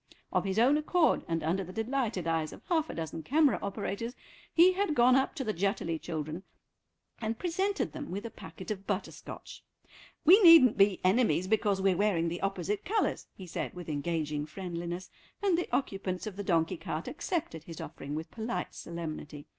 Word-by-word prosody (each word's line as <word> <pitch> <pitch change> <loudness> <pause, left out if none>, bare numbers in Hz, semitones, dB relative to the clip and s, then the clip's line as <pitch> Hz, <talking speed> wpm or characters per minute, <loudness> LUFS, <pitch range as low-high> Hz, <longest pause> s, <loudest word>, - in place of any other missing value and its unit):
Of 185 0 +1
his 195 +1 -1
own 255 +6 +5
accord, 320 +2 +2
and 165 -1 -1
under 180 +5 0
the 185 - -9
delighted 225 -3 -1
eyes 165 -2 0
of - - -12
half 320 -3 +1
a - - -5
dozen 160 0 -4
camera 295 - +3
operators, 205 +4 -4 0.4
he 345 +3 +6
had 375 -5 0
gone 250 0 +6
up 265 +4 +1
to 280 - -2
the 215 -3 -1
Jutterly 170 -3 -1
children 155 0 -4 0.8
and 225 0 -2
presented 380 - -1
them 295 -2 -7
with 200 +4 -4
a 230 - -5
packet 185 +3 -9
of 195 -2 -5
butterscotch; 200 -1 -5 0.6
"we 375 +7 +8
needn't 330 - +9
be 195 -2 +4
enemies 185 -3 +3
because 205 -1 +1
we're 195 -2 +4
wearing 175 -4 +2
the 175 - -5
opposite 195 0 -2
colours," 430 +3 0
he 190 - -9
said 175 - -4
with 175 -2 -7
engaging 150 -1 -2
friendliness, 175 +1 -5 0.3
and 390 -4 +4
the 350 - -2
occupants 195 -7 -2
of 210 -3 -5
the 205 - -4
donkey 170 -1 +1
cart 160 0 -4
accepted 300 - -3
his 165 -2 -9
offering 145 +2 -6
with 160 +2 -5
polite 220 -5 -4
solemnity. 155 -3 -6
195 Hz, 180 wpm, -30 LUFS, 170-255 Hz, 0.8 s, needn't